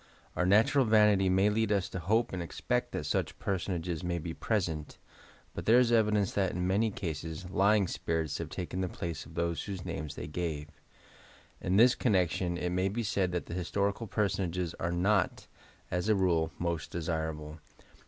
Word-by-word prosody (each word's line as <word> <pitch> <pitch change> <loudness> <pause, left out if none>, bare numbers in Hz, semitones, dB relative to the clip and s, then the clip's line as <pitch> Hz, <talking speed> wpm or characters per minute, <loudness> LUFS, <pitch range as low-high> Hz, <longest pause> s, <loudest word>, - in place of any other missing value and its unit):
Our 90 - +1
natural 110 +8 +5
vanity 105 -4 +4
may 95 +3 +3
lead 110 0 +1
us 100 -2 +1
to 95 - -4
hope 110 +7 +1
and 90 - -2
expect 85 - -2
that - - -2
BUch - - -1
personages 90 -3 -2
may 90 0 -1
be 85 0 -5
present, 80 -9 -2 0.6
but - - -6
there 115 +2 +7
is 125 -1 +4
evidence 105 -4 +3
that, 95 -3 0
in 90 0 -1
many 100 +5 +2
cases, 80 -2 -5
lying 100 0 +3
spirits 80 -2 -2
have - - -4
taken 90 +1 -4
the 90 - -1
places 85 -4 -5
of 80 - -14
those 85 0 -1
whose 95 -3 -6
names 75 +1 -5
they - - -5
gave, 75 -2 -4 0.9
In 95 +1 +1
this 120 +3 +7
connection 90 -5 +1
it 90 0 -2
may 90 +2 +1
be 115 +4 -2
said 95 -3 0
that 90 - -2
historical 100 +5 -1
personages 90 -4 -1
are 85 - -1
not, 95 +3 +1 0.5
as 90 +4 -1
a 110 - +5
rule, 85 -4 +2
most 85 -3 -2
desirable. 80 -2 -3
90 Hz, 175 wpm, -31 LUFS, 85-100 Hz, 0.9 s, there